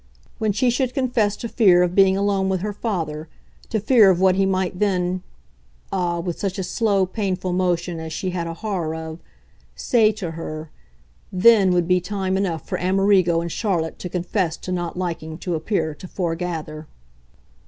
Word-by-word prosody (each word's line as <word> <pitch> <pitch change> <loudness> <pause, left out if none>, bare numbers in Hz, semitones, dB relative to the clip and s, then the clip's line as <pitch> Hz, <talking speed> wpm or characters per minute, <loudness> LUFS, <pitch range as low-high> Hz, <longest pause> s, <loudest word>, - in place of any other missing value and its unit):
When 215 -2 +1
she 240 +5 +2
should 250 +1 -1
confess 240 -6 +1
to 235 - -5
fear 195 -6 +5
of 175 0 0
being 190 0 +5
alone 195 -1 +1
with 190 -2 0
her 210 +1 -3
father, 165 -8 -3 0.4
to 220 - 0
fear 215 -1 +6
of 180 -2 +3
what 190 0 +5
he 195 +1 +2
might 185 -1 -1
then 185 -3 0 0.7
ah, 175 -2 0
with 170 -1 -4
such 195 -2 -2
a 190 - -2
slow, 200 +1 +1
painful 185 -2 -2
motion 175 -2 0
as 160 0 -6
she 185 +3 -3
had 175 -2 -3
a 165 - -5
horror 170 -5 -3
of! 160 0 -7 0.6
say 225 -5 +3
to 190 -6 -5
her, 155 -1 -7 0.6
THEN 195 +1 +5
would 175 -2 +2
be 180 0 +3
time 190 0 -2
enough 180 -6 -2
for - - -2
Amerigo 185 -2 +3
and 170 0 -4
Charlotte 175 -7 -1
to 180 - -5
confess 175 -1 -1
to 185 - -7
not 175 -1 -3
liking 165 -3 -4
to 180 0 -4
appear 160 -1 -1
to 185 - -11
foregather. 165 -4 -4
185 Hz, 180 wpm, -22 LUFS, 170-200 Hz, 0.7 s, fear